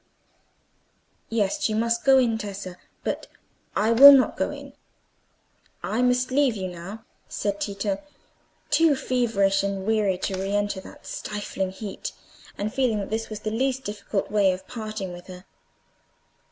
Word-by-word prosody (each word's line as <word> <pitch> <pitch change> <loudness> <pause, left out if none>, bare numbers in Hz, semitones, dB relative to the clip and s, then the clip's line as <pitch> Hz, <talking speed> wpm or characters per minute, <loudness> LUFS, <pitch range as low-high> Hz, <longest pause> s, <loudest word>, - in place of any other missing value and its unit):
"Yes, 215 -1 0
you 215 - -1
must 230 +1 +1
go 270 -1 +6
in, 235 -4 +2
Tessa; 195 -3 -6 0.3
but - - -3 0.5
I 215 +3 +2
will 275 +5 +11
not 270 -2 +5
go - - -1
in. - - -9 1.1
I 225 - -1
must 250 +1 +2
leave 270 -3 +3
you 190 -2 -3
now," 190 +6 -9 0.2
said 200 -1 -2
Tito, 200 -1 -2 0.7
too 305 0 +5
feverish 225 -7 +1
and 195 -1 -3
weary 210 -4 +2
to 190 0 -3
re 195 +1 -2
enter 205 -2 -1
that - - -14
stifling 205 -2 -4
heat, 195 +2 -6 0.4
and 210 +1 -3
feeling 255 -5 +1
that 200 0 -4
this 225 +1 -2
was 215 -1 -6
the 215 - -3
least 265 +3 0
difficult 205 -2 -3
way 205 -2 +4
of 185 +1 -6
parting 215 -5 -5
with 175 +1 -11
her. 180 0 -11
210 Hz, 155 wpm, -25 LUFS, 195-235 Hz, 1.1 s, will